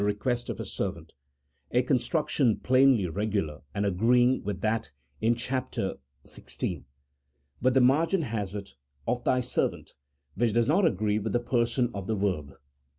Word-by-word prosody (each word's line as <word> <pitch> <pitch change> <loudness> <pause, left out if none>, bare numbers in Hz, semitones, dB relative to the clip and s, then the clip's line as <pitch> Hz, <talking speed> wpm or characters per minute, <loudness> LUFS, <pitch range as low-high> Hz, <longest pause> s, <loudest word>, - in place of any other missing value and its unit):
143 105 0 0
quest 120 -1 -1
of - - -3
his - - -6
servant," - - -4 0.6
a 125 +1 +2
construction 130 -1 +1
plainly 130 -6 +4
regular, 95 -4 -2
and 100 - 0
agreeing 120 +6 +3
with 100 -2 -4
that 110 +1 0 0.3
in 115 +2 +3
chap. 130 +2 -3 0.5
xvi. - - -5 0.8
But 130 +2 +3
the 130 - +6
margin 160 +8 +3
has 105 -6 -3
it 100 -4 -7 0.3
"of 120 0 -1
thy 125 +1 +2
servant," 125 - -2 0.4
which 115 +5 +1
does 120 0 +2
not 170 +5 +4
agree 105 - 0
with 110 +1 -3
the 120 - +3
person 120 0 0
of 100 -2 -5
the 110 - 0
verb. 90 -8 -1
115 Hz, 155 wpm, -28 LUFS, 105-125 Hz, 0.8 s, the